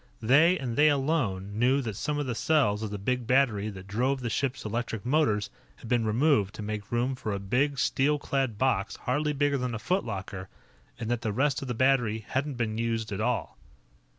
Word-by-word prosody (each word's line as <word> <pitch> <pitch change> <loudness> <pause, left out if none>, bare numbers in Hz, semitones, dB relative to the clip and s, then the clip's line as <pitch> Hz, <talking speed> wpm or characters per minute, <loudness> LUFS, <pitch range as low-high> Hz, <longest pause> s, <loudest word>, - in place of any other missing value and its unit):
They, 155 +10 +5
and 125 -5 -4
they 150 +1 +6
alone, 125 -9 -1
knew 130 +3 +3
that 110 -4 -4
some 150 +8 -2
of 145 - -1
the 125 - -2
cells 115 -6 +2
of 110 - -3
the 105 - -4
big 125 +4 -2
battery 115 -6 +2
that 95 -2 -9
drove 125 +7 0
the 120 -2 -3
ship's 135 -1 -2
electric 115 0 -3
motors 115 -8 +1 0.2
had - - -12
been 115 -2 +1
removed 110 -3 +2
to 110 - -6
make 105 -1 -5
room 120 +3 +1
for 125 -4 -4
a - - -1
big, 130 +9 0
steel 145 +3 +2
clad 135 -6 -1
box 105 -5 0
hardly 150 +4 -1
bigger 145 -1 +1
than 125 -2 -2
a - - -2
foot 180 - 0
locker, 95 -3 -6 0.5
and 115 0 -3
that 120 -1 0
the 110 - -1
rest 135 +5 +1
of 135 - -5
the 125 - -2
battery 120 -4 +2
hadn't 140 +1 -2
been 115 -2 -2
used 115 -2 -1
at 100 +1 -3
all. 120 0 -2
120 Hz, 210 wpm, -28 LUFS, 110-135 Hz, 0.5 s, they